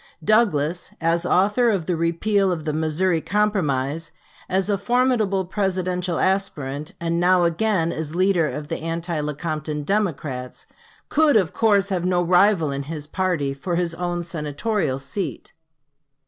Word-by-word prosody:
Douglas, 175 -6 +1
as 170 +1 +1
author 210 +6 +3
of 195 -7 0
the 180 - 0
repeal 185 +4 +1
of 165 -3 -3
the 155 - -1
Missouri 160 +2 0
Compromise, 165 -8 0 0.4
as 190 +1 +1
a 205 - +2
formidable 220 -3 +1
Presidential 185 -2 -1
aspirant, 155 -7 -1
and 170 0 -1
now 180 0 +4
again 170 0 +1
as 160 0 -5
leader 185 -3 +3
of 150 0 -5
the - - -3
anti 165 +1 -3
Lecompton 150 0 -3
Democrats, 145 -9 -2 0.4
could, 300 -4 +4
of 185 -6 +1
course, 205 -3 +3
have 185 -3 -1
no 180 -1 +2
rival 180 -3 +3
in 140 0 -3
his 155 -3 -5
party 165 -5 -1
for 170 +6 -3
his 170 -1 0
own 175 0 -3
Senatorial 155 0 -2
seat. 140 +3 -5
175 Hz, 145 wpm, -23 LUFS, 155-195 Hz, 0.4 s, now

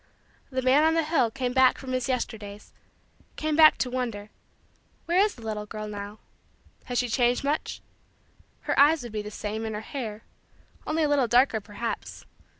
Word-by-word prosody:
The 260 -1 -2
man 265 +4 +5
on 320 +1 +3
the 330 - +2
hill 300 -7 +2
came 250 +1 -3
back 260 -1 +5
from 260 -2 -7
his 255 0 -1
Yesterdays 210 -5 -4 0.6
came 310 -1 -1
back 310 0 +7
to 255 - -1
wonder: 230 -5 -4 0.7
"where 345 +2 +2
is 415 +1 +3
the 235 - -13
little 210 -1 -4
girl 215 0 -6
now? 205 0 -7 0.7
Has 245 - -3
she 250 - +1
changed 245 +1 +1
much? 290 +2 -2 0.8
Her - - -1
eyes 295 0 +5
would 240 - -8
be 215 -1 -3
the 210 - -7
same 215 +1 -5
and 220 -1 -4
her 210 - -4
hair 225 -4 -6 0.6
only 315 +1 +1
a - - +3
little 285 -4 +2
darker 240 -1 +3
perhaps. 210 +3 -6
245 Hz, 180 wpm, -26 LUFS, 215-280 Hz, 0.8 s, back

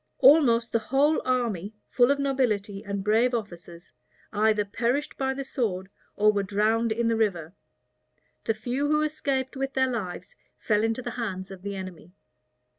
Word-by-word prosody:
All 285 +5 +8
most 235 -4 +1
the 230 - +2
whole 275 +7 +2
army, 225 -6 -1
full 245 0 +3
of 280 - +3
nobility 220 -8 -1
and 200 -2 -4
brave 230 +4 +3
officers, 175 -5 -7 0.4
either 215 0 +2
perished 245 +8 -1
by 265 0 -1
the 275 - -4
sword 195 -8 -2 0.3
or 210 +1 +4
were 200 - +1
drowned 215 +3 +1
in 230 +1 0
the 230 - +2
river. 185 -7 -1 0.9
The 225 - +1
few 245 +6 -2
who 300 +1 +2
escaped 280 -3 -2
with 270 0 -3
their 260 -1 +2
lives 190 -7 -5 0.2
fell 210 -1 +1
into 225 +3 -1
the - - -4
hands 190 -3 -4
of 190 -2 -10
the 200 +1 -5
enemy. 185 -2 -8
225 Hz, 170 wpm, -26 LUFS, 200-260 Hz, 0.9 s, All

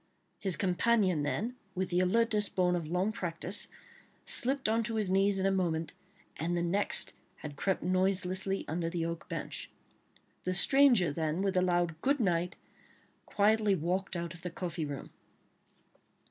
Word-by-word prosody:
his 190 -4 +3
companion 190 -2 +2
then, 220 +12 -2 0.2
with 185 0 -2
the 175 - +2
alertness 210 +2 +2
borne 180 -1 +1
of 165 -3 -4
long 180 +5 0
practice, 180 -2 0 0.6
slipped 265 +1 +2
on 225 +1 +2
to 225 0 -2
his 210 -4 0
knees 195 +1 +3
in 190 - 0
a 195 - +3
moment, 165 -4 -1 0.4
and 175 +2 -1
the 170 - 0
next 195 +4 +1 0.2
had 150 -5 -9
crept 190 +6 -1
noiselessly 185 +1 0
under 165 +2 -2
the 165 -1 -2
oak 170 0 -5
bench. - - -5 0.7
The 185 0 -1
stranger 250 - +5
then, 160 +4 -2
with 195 -1 0
a 180 - +4
loud 175 -3 0
"Good 280 +1 +1
night," 180 -4 0 0.7
quietly 210 0 +2
walked 185 +3 -2
out 170 -1 -4
of 170 - -13
the 180 - -4
coffee 170 -2 -4
room. 145 -2 -7
185 Hz, 160 wpm, -31 LUFS, 170-200 Hz, 0.7 s, stranger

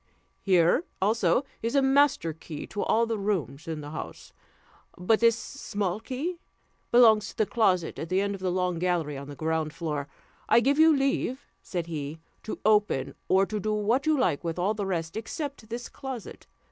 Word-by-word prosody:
Here 185 - +3 0.2
also 210 +3 +2 0.2
is 230 +4 -2
a 275 - +5
master 270 - +3
key 155 -1 -8
to 205 - -5
all 230 +1 +2
the 225 -2 -2
rooms 165 - -2
in 160 -2 -4
the 145 0 -8
house; 155 - -8 0.6
but 195 +5 +2
this 230 -1 +4
small 205 -9 -3
key 285 +10 -4 0.5
belongs 220 -3 +6
to - - -11
the 215 - +3
closet 185 -7 +1
at 165 - -5
the 185 - +2
end 200 0 0
of 195 - -7
the 185 - 0
long 180 -1 0
gallery 170 -5 0
on 140 +1 -7
the 145 - -7
ground 160 0 -2
floor. 150 -4 -3 0.4
I - - +7
give 280 +5 +2
you 320 -2 +6
leave," 275 -1 -1 0.2
said 175 -3 -4
he, 155 -1 -5 0.2
"to 220 - -5
open, 210 -11 +2
or 190 +1 +4
to 210 +1 -3
do 215 +1 -1
what 230 +7 +1
you 310 -1 +4
like 175 - +1
with 165 0 -3
all 190 +4 +1
the 205 -2 -3
rest 165 -3 -2
except 245 +1 -5
this 240 +1 -5
closet. 260 -5 -8
200 Hz, 190 wpm, -27 LUFS, 165-235 Hz, 0.6 s, I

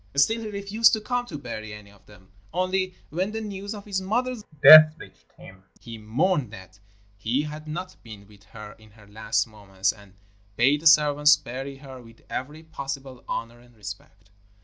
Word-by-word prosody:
Still 220 +12 +2
he 220 - -6
refused 205 +2 +2
to 220 - +1
come 245 +3 -3
to 155 - -7
bury 110 -5 -7
any 105 -1 -14
of 100 - -24
them, 95 -3 -19 0.2
only, 185 +1 -1 0.2
when 185 +6 -2
the 220 - -3
news 205 -1 -6
of 205 - -10
his 195 -2 -3
mother's 240 +4 -2 0.2
death 155 0 +10
reached - - -16
him, 95 0 -15 0.2
he 115 -2 -10
mourned 135 - 0
that 95 -1 -13 0.4
he 120 +8 -1
had 150 +1 -8
not 180 +4 -7
been 105 -3 -13
with 100 -1 -20
her 105 -1 -11
in 110 0 -18
her 105 - -17
last 105 +1 -1
moments, 100 -4 -3
and 100 -2 -19 0.4
bade 140 +6 +3
the 165 - +3
servants 150 -1 +5
bury 135 +3 -7
her 135 -2 -12
with 115 -1 -18
every 150 +5 -6
possible 135 -4 -7
honour 115 +1 -5
and 120 0 -21
respect. 105 -1 -11
135 Hz, 185 wpm, -25 LUFS, -, 0.4 s, death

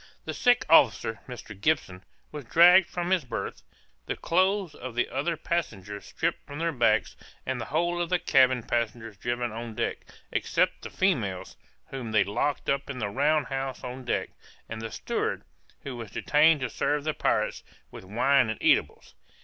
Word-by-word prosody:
The - - -4
sick 245 -1 +3
officer, 115 -7 +4
Mr. 125 -4 -8
Gibson, 100 -5 -1 0.3
was 150 -4 -7
dragged 175 +7 +7
from 175 -1 -3
his 185 -4 +3
berth; 125 - -5 0.5
the - - -2
clothes 185 0 +1
of 130 -2 -8
the 120 - +1
other 155 +5 -2
passengers 105 - -3
stripped - - -2
from 145 - -8
their 165 +1 0
backs, 115 -6 +2 0.3
and 130 -2 -2
the - - -4
whole 175 +3 0
of 170 - -2
the 180 - +3
cabin 130 -6 +3
passengers 115 -2 -2
driven 120 +3 -2
on 115 0 -7
deck, - - -2 0.3
except - - 0
the - - -7
females, 115 - -1 0.3
whom 125 -5 -6
they 105 - +5
locked 140 +8 -2
up 140 0 -1
in 140 - -5
the 105 -4 -2
round 145 +5 +2
house 135 -1 -4
on 130 +1 -6
deck, 120 - -2 0.4
and 110 0 -6
the 115 - -5
steward, - - -3 0.4
who 135 -3 -6
was 115 -3 -7
detained 150 0 +3
to 130 - -1
serve 145 0 0
the 155 0 -1
pirates - - 0 0.3
with - - -10
wine 125 +5 +2
and 110 - -4
eatables. - - +1
130 Hz, 175 wpm, -27 LUFS, 115-155 Hz, 0.5 s, dragged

